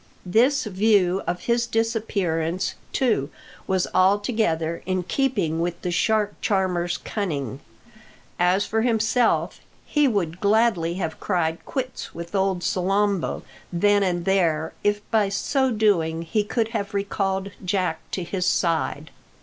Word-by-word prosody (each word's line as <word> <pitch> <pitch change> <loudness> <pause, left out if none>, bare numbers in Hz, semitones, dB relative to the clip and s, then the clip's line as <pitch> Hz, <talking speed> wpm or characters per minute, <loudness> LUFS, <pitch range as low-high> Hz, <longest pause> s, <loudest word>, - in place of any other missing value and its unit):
This 255 +9 +3
view 195 -3 +2
of 175 - -2
his 235 0 +1
disappearance, 195 -7 -1 0.2
too, 220 - +1 0.4
was 190 -1 +1
altogether 185 -4 +1
in 185 -1 0
keeping 195 - 0
with 175 0 -2
the 180 - -1
shark 210 +3 +1
charmer's 180 -3 0
cunning. 140 - -3 0.8
As 180 +3 +3
for 220 0 0
himself, 225 0 +1 0.3
he 295 -2 +2
would 180 -8 -1
gladly 200 -5 +2
have 165 -4 -4
cried 170 -4 -1
quits 260 -2 -4
with 170 +2 -7
old 190 -2 0
Salambo 195 0 0 0.3
then 205 +3 +3
and 175 -3 0
there, 165 -5 +1
if 205 0 0
by 215 -3 +3
so 265 +7 +1
doing 175 -8 +1
he 205 +6 0
could 225 +1 -1
have 210 -2 -3
recalled 195 -1 -1
Jack 180 -3 0
to 185 - -3
his 180 +1 -2
side. 160 -3 0
195 Hz, 130 wpm, -24 LUFS, 175-220 Hz, 0.8 s, This